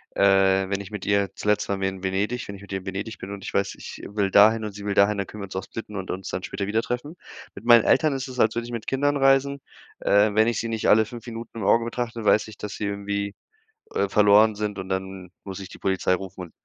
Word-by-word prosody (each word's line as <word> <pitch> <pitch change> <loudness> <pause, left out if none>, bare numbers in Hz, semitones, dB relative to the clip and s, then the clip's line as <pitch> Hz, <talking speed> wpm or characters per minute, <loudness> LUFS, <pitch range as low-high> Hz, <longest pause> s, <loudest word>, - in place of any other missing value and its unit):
äh, 95 -1 +4
wenn 100 0 -1
ich 100 - -10
mit 105 -2 -6
ihr 100 -1 +2
zuletzt 105 0 0
waren 100 -1 -1
wir 95 - +1
in 95 0 -9
Venedig, 100 +6 -1
wenn 100 - -7
ich 100 - -12
mit 100 - -13
ihr 95 -1 -4
Venedig 100 +3 -5
bin 95 - -7
und 100 -1 -7
ich - - -6
weiß, 100 0 0
ich - - -9
will 100 -1 -1
dahin 110 +3 +6
und 105 - -5
sie 100 +1 -9
will 100 - 0
dahin, 100 +1 +4
dann 100 -2 -2
können 105 - -9
wir - - -3
uns 95 - -11
auch 95 - -2
splitten 105 +1 -8
und 95 -1 -6
uns 95 0 -5
dann 95 - -4
später 100 0 -4
wieder 110 +2 +1
treffen. 125 +8 -4 0.4
Mit - - -11
meinen 120 -2 +7
Eltern 155 -3 +3
ist 135 -1 -3
es 130 -1 -8
als 110 -1 +3
würde 115 0 -2
ich 120 - -8
mit 115 -2 -5
Kindern 145 +2 +1
reisen, 135 +1 +3 0.4
äh, 105 +1 +3
wenn 110 +2 +4
ich 115 -3 0
sie 115 - -3
nicht 110 -1 0
alle 110 +1 +6
5 120 +1 -10
Minuten 115 0 -7
im - - -4
Augen 115 +3 +4
betrachte, 120 -1 -4
weiß 105 +1 +4
ich, 105 - -12
dass 105 - -6
sie 105 - -3
irgendwie, 100 0 -3 0.6
äh, 450 - +1
verloren 105 +1 +5
sind 105 -1 -3
und 95 0 -6
dann 95 -1 -4
muss 95 -1 -7
ich 95 - -8
die - - -12
Polizei 95 -1 +1
rufen 95 0 -7
und 85 - -15
105 Hz, 275 wpm, -24 LUFS, 95-115 Hz, 0.6 s, meinen